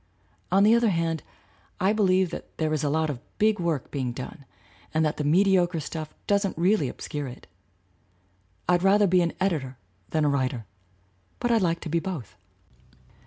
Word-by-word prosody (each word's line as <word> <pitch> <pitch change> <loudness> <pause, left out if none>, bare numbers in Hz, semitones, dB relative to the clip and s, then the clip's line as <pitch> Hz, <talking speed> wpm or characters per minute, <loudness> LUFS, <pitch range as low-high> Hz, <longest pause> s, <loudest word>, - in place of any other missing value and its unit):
On 195 +2 +5
the 215 +2 +6
other 235 -1 +4
hand, 165 -3 0 0.6
I 190 +3 +3
believe 190 -4 +3
that - - -9
there 155 -1 0
is 155 - -1
a 145 - +1
lot 155 +1 +1
of 130 - -7 0.2
big 215 -1 +3
work 165 -6 -1
being 130 -4 -2
done 135 +3 -8 0.5
and 160 0 +3
that 150 - -1
the 150 - -1
mediocre 175 +2 +3
stuff 155 +1 -6
doesn't 200 -3 +1
really 175 -4 +2
obscure 145 +2 -5
it. 125 - -10 1.2
I'd 180 -1 +3
rather 200 +2 +5
be 180 -1 +4
an 170 -1 0
editor 150 -9 -1 0.3
than 155 -1 +1
a - - +3
writer, 130 -4 -1 0.7
but 240 - 0
I 230 - +5
like 170 -4 0
to - - -5
be 170 +2 +1
both. 165 - -6
165 Hz, 175 wpm, -26 LUFS, 150-190 Hz, 1.2 s, the